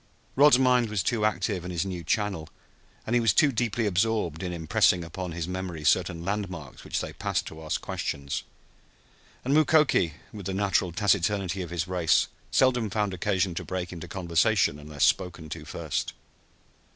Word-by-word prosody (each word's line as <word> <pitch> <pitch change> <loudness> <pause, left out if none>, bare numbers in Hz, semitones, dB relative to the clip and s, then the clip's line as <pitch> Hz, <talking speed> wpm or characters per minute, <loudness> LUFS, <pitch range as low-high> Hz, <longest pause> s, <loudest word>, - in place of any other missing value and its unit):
Rod's 145 -1 +7
mind 125 -3 +3
was 105 -4 -1
too 110 -3 +1
active 100 -2 -1
in 90 - -5
its 85 +1 -1
new 90 -3 -5
channel, 95 -3 -1 0.6
and 115 - -2
he - - +5
was 115 -5 +3
too 150 -2 +5
deeply 120 -1 -1
absorbed 100 -4 0
in 90 -1 -3
impressing 85 +1 +2
upon 90 +2 -6
his 85 0 -4
memory 90 -4 -5
certain 85 +2 +1
landmarks 95 -7 -4
which - - -2
they - - -6
passed - - -2
to 80 0 -9
ask 80 - -2
questions; 70 0 -3 1.0
and 135 - +1
Mukoki, 150 - +4 0.2
with 100 -3 -7
the 95 - -2
natural 95 -2 +1
taciturnity 100 0 +1
of 90 - -5
his 85 0 -2
race, 90 -3 +2 0.2
seldom 125 -4 +2
found 105 -1 -1
occasion 95 -1 0
to - - -4
break 90 -1 -4
into 85 - -8
conversation 90 -2 +1
unless 75 -1 -3
spoken 85 -4 +1
to - - -7
first. - - -3
95 Hz, 170 wpm, -27 LUFS, 85-105 Hz, 1.0 s, Rod's